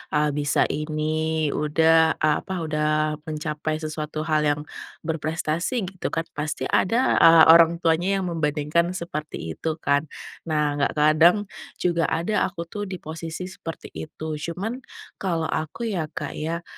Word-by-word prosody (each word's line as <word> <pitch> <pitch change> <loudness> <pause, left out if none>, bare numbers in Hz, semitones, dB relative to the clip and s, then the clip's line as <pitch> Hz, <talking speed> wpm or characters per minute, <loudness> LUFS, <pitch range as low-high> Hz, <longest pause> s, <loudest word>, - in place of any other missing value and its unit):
ah, 150 0 +2
bisa 145 0 +1
ini, 155 0 -1
udah, 160 +2 +3
ah, 150 -1 +3
apa, 185 -3 -4
udah 155 0 0
mencapai 155 0 -3
sesuatu 155 0 -4
hal 155 -1 +1
yang 145 0 +1 0.4
berprestasi,” 160 +6 -1
gitu 185 - -4
kan. 165 - 0
Pasti 150 -2 -4
ada, 235 +7 +3
ah, 165 0 +8
orang 170 0 +7
tuanya 175 +4 +2
yang - - -2
membandingkan 160 +2 0
seperti 155 - -5
itu 155 - -3
kan. 145 +2 +2 0.4
Nah 150 -2 0
nggak 140 - 0
kadang 160 +7 +5 0.3
juga 170 -2 +1
aku 170 +1 -1
tuh 205 -1 -4
di 190 - -5
posisi 165 +3 -6
seperti 165 -3 -8
itu. 155 0 -6
Cuman 190 +11 -4 0.4
kalau 170 -4 -1
aku 155 +10 -3
ya, 170 -5 -2
Kak, 145 -1 -5
ya, 165 +2 -3
160 Hz, 145 wpm, -24 LUFS, 150-170 Hz, 0.4 s, ah